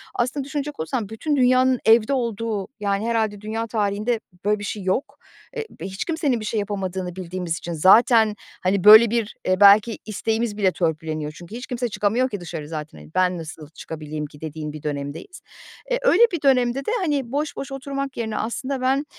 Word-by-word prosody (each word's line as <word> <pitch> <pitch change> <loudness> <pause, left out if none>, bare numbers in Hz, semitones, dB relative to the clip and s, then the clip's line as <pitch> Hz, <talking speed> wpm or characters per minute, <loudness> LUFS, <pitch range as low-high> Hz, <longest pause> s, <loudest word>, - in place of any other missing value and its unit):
aslında 255 +4 -1
düşünecek 285 +1 -5
olursan 205 +6 -3
bütün 290 +7 -2
dünyanın 255 -1 +4
evde 225 +3 +5
olduğu, 230 -5 -2
yani, 200 0 -1
herhâlde 220 -3 0
dünya 220 +2 -3
tarihinde 215 +1 -1 0.3
böyle 210 0 +2
bir - - -7
şey 205 0 -4
yok. 190 +9 -1 0.4
Eee, 450 -1 -4
bi 165 - -6
hiç 190 +1 -4
kimsenin 310 -7 0
bir 215 - -6
şey 215 0 -1
yapamadığını 190 -3 -3
bildiğimiz 180 -2 -4
için 170 - -6
zaten, 220 +6 +5 0.3
hani, 185 0 +1
böyle 220 +2 +10
bir, 230 -2 -1
eee, 185 0 +1
belki 210 +3 +6
isteğimiz 220 +1 -2
bile 195 -3 +3
törpüleniyor 155 -3 -2
çünkü 175 +6 -10
hiç 250 +2 -7
kimse 245 -2 -2
çıkamıyor 225 +5 +1
ki 205 - -5
dışarı 165 -3 -6
zaten, 155 -1 -7
eee, - - -14
ben 185 -1 +2
nasıl 160 -2 -9
çıkabileyim 155 -1 -6
ki, 145 0 -14
dediğin 155 -1 -6
bir 155 - -9
dönemdeyiz. 145 - -5 0.5
Eee, - - +2
öyle - - +5
bir 345 -4 -3
dönemde 255 -2 +3
de, - - -1
hani, 290 - -1
boş 290 +2 -2
boş 275 0 -6
oturmak 275 0 -4
yerine 220 -2 -3
aslında 260 +4 -3
ben, 270 +3 +1
215 Hz, 190 wpm, -23 LUFS, 185-255 Hz, 0.5 s, böyle